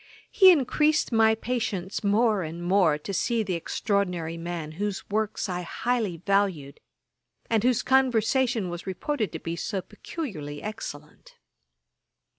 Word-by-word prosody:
He 380 Hz, -2 st, +8 dB
increased 305 Hz, 0 st, +2 dB
my 225 Hz, -1 st, +5 dB
impatience 220 Hz, -5 st, -3 dB
more 210 Hz, 0 st, +3 dB
and 165 Hz, +1 st, -6 dB
more 175 Hz, -4 st, +3 dB
to 175 Hz, +6 st, -6 dB
see 230 Hz, +3 st, +1 dB
the 190 Hz, -3 st, -2 dB
extraordinary 175 Hz, -1 st, -1 dB
man 165 Hz, -2 st, -5 dB
whose 200 Hz, +4 st, -4 dB
works 215 Hz, 0 st, -1 dB
I 180 Hz, -1 st, -3 dB
highly 215 Hz, 0 st, -1 dB
valued, 185 Hz, -6 st, 0 dB, 0.7 s
and 225 Hz, -2 st, +2 dB
whose 250 Hz, -1 st, +2 dB
conversation 245 Hz, -4 st, +2 dB
was 175 Hz, +2 st, -7 dB
reported 215 Hz, -, -2 dB
to -, -, -3 dB
be 165 Hz, -, -4 dB
so 190 Hz, +4 st, -3 dB
peculiarly 190 Hz, -, -6 dB
excellent. 150 Hz, -8 st, -8 dB
200 Hz, 130 wpm, -26 LUFS, 175-230 Hz, 0.7 s, He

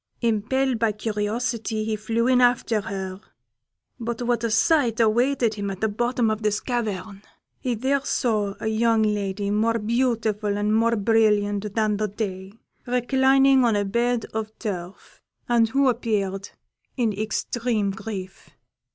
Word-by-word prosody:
Impelled 235 Hz, +3 st, 0 dB
by 225 Hz, -1 st, +2 dB
curiosity, 220 Hz, +1 st, -2 dB
he 215 Hz, 0 st, -1 dB
flew 225 Hz, +2 st, -1 dB
in 250 Hz, 0 st, +4 dB
after 240 Hz, -3 st, +2 dB
her; 195 Hz, -2 st, -5 dB, 0.8 s
but 235 Hz, -1 st, -4 dB
what 240 Hz, -1 st, 0 dB
a 230 Hz, -, +1 dB
sight 240 Hz, 0 st, +2 dB
awaited 235 Hz, +1 st, +2 dB
him 205 Hz, -1 st, -4 dB
at 190 Hz, -1 st, -6 dB
the 220 Hz, -, +1 dB
bottom 240 Hz, +1 st, 0 dB
of 215 Hz, 0 st, -3 dB
this 210 Hz, -1 st, 0 dB
cavern! 215 Hz, -5 st, -3 dB, 0.4 s
He 250 Hz, -2 st, -1 dB
there 265 Hz, +4 st, 0 dB
saw 215 Hz, -7 st, 0 dB
a -, -, -6 dB
young 220 Hz, 0 st, +2 dB
lady, 205 Hz, -1 st, -1 dB
more 225 Hz, +2 st, +2 dB
beautiful 220 Hz, -2 st, 0 dB
and 210 Hz, +1 st, 0 dB
more 230 Hz, +1 st, +3 dB
brilliant 210 Hz, -2 st, +1 dB
than 215 Hz, -2 st, +1 dB
the 215 Hz, +1 st, 0 dB
day, 190 Hz, -2 st, -5 dB, 0.4 s
reclining 265 Hz, +2 st, +4 dB
on 230 Hz, -3 st, +3 dB
a 205 Hz, 0 st, +1 dB
bed 235 Hz, +3 st, 0 dB
of 220 Hz, 0 st, -4 dB
turf, 185 Hz, -4 st, -7 dB, 0.3 s
and 235 Hz, -2 st, +3 dB
who 275 Hz, +3 st, +2 dB
appeared 205 Hz, -5 st, -1 dB, 0.5 s
in 230 Hz, -4 st, +1 dB
extreme 220 Hz, 0 st, -1 dB
grief. 195 Hz, -2 st, -7 dB
220 Hz, 145 wpm, -24 LUFS, 205-240 Hz, 0.8 s, in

